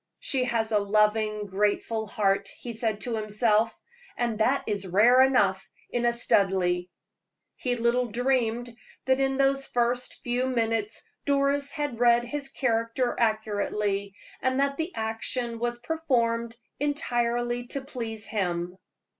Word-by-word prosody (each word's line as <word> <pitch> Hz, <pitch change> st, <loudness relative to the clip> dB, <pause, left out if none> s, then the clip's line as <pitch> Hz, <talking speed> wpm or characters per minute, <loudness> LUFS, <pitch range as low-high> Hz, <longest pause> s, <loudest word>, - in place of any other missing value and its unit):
"She 260 Hz, -2 st, 0 dB
has 230 Hz, -2 st, 0 dB
a 210 Hz, -, +4 dB
loving, 210 Hz, +1 st, +1 dB
grateful 210 Hz, +3 st, 0 dB
heart," 200 Hz, -2 st, +1 dB
he 240 Hz, -, -7 dB
said 220 Hz, -2 st, -1 dB
to 240 Hz, -2 st, -2 dB
himself, 215 Hz, +1 st, +1 dB, 0.4 s
"and 235 Hz, -3 st, -1 dB
that 255 Hz, +5 st, +2 dB
is 200 Hz, -3 st, -2 dB
rare 225 Hz, +8 st, +6 dB
enough 205 Hz, -8 st, +3 dB, 0.2 s
in 240 Hz, 0 st, +1 dB
a -, -, +4 dB
Studleigh." 190 Hz, -6 st, +1 dB, 0.7 s
He 250 Hz, -3 st, -1 dB
little 240 Hz, +1 st, +1 dB
dreamed 240 Hz, 0 st, 0 dB, 0.3 s
that 260 Hz, 0 st, +3 dB
in 270 Hz, 0 st, +1 dB
those 275 Hz, 0 st, +2 dB
few 245 Hz, +1 st, -1 dB
minutes 225 Hz, -3 st, -1 dB, 0.2 s
Doris 280 Hz, 0 st, +2 dB
had 290 Hz, -7 st, -3 dB
read 240 Hz, 0 st, +4 dB
his 275 Hz, +2 st, -4 dB
character 240 Hz, -1 st, 0 dB
accurately, 210 Hz, -2 st, 0 dB, 0.3 s
and 260 Hz, +1 st, +1 dB
that 280 Hz, 0 st, +1 dB
the 325 Hz, +3 st, -2 dB
action 225 Hz, +2 st, -2 dB
was 240 Hz, 0 st, -1 dB
performed 240 Hz, -5 st, -1 dB, 0.2 s
entirely 240 Hz, -4 st, -1 dB
to 275 Hz, -, -4 dB
please 230 Hz, -5 st, -5 dB
him. 180 Hz, -3 st, -2 dB
235 Hz, 130 wpm, -27 LUFS, 215-255 Hz, 0.7 s, rare